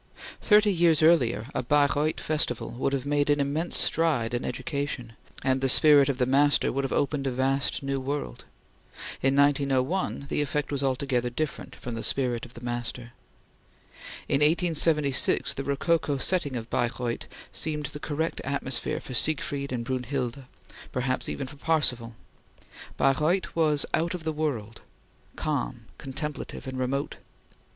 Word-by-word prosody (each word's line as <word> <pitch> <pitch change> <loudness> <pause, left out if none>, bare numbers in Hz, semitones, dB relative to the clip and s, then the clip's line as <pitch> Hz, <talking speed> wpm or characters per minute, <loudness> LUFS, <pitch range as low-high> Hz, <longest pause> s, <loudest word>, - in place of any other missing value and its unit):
Thirty 210 -1 +5
years 165 -3 +3
earlier, 140 -9 +4
a - - 0
Baireuth 145 +3 +2
festival 150 -6 -1
would 130 +2 -1
have 135 -1 -2
made 145 0 +1
an 145 0 +3
immense 145 +5 0
stride 145 -9 +2
in 120 - -1
education, 140 -4 -4 0.3
and 130 0 +1
the 135 - +2
spirit 145 0 +7
of 135 - 0
the 125 - +2
master 145 +3 +3
would 140 +1 -1
have 135 - -2
opened 140 -1 0
a - - 0
vast 135 +2 0
new 135 0 -1
world. 135 - -4 0.8
In 135 +1 +2
1901 140 +3 +1
the 150 - -1
effect 145 +1 -2
was 140 -1 -1
altogether 130 -2 0
different 150 +5 -4
from 120 - -7
the 115 - -4
spirit 125 -2 -1
of 120 - -20
the 120 - -9
master. 120 0 -4 1.2
In 140 - +2
1876 155 -3 +2
the 135 - -4
rococo 145 +1 0
setting 145 -2 0
of 115 -1 -6
Baireuth 120 0 -1 0.2
seemed 150 +10 -1
the 145 +2 -6
correct 160 +2 -2
atmosphere 135 -2 -2
for 130 - -9
Siegfried 140 0 -1
and 120 -2 -3
Brunhilde, 130 0 -3 0.5
perhaps 130 0 -1
even 140 - -3
for 145 +2 -11
Parsifal. 125 -7 0 0.8
Baireuth 155 +7 +1
was 150 -3 +3
out 170 +3 +1
of 175 - -7
the 160 0 -2
world, 125 -8 -3 0.5
calm, - - -3
contemplative, 145 +2 -6
and 130 -1 -5
remote. 135 +2 -2
140 Hz, 150 wpm, -27 LUFS, 125-150 Hz, 1.2 s, spirit